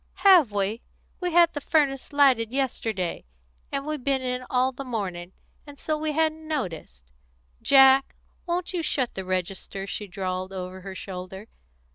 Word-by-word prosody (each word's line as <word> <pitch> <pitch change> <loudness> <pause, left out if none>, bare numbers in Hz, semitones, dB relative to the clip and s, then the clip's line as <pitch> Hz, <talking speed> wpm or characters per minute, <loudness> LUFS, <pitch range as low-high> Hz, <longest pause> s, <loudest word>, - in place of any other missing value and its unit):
"Have 350 - +7
we? 205 +3 -1 0.4
We 360 -1 -2
had 340 0 +5
the 290 - -4
furnace 280 -3 +1
lighted 265 -6 +4
yesterday, 225 -9 -2 0.5
and 275 0 -2
we've 305 -3 -4
been 270 -1 +1
in 250 0 -2
all 255 +1 +2
the 270 +1 -7
morning, 190 -8 -4 0.4
and 285 -1 -12
so 310 - -1
we 305 0 -2
hadn't 315 0 0
noticed. 175 - -5 0.5
Jack, 270 0 +6 0.3
won't 350 +2 -2
you 350 - -1
shut 260 -6 -1
the 190 - -5
register?" 185 +1 -3
she 205 +1 -5
drawled 185 0 -4
over 185 0 -6
her 190 0 -8
shoulder. 190 +2 -8
255 Hz, 155 wpm, -25 LUFS, 190-290 Hz, 0.5 s, Have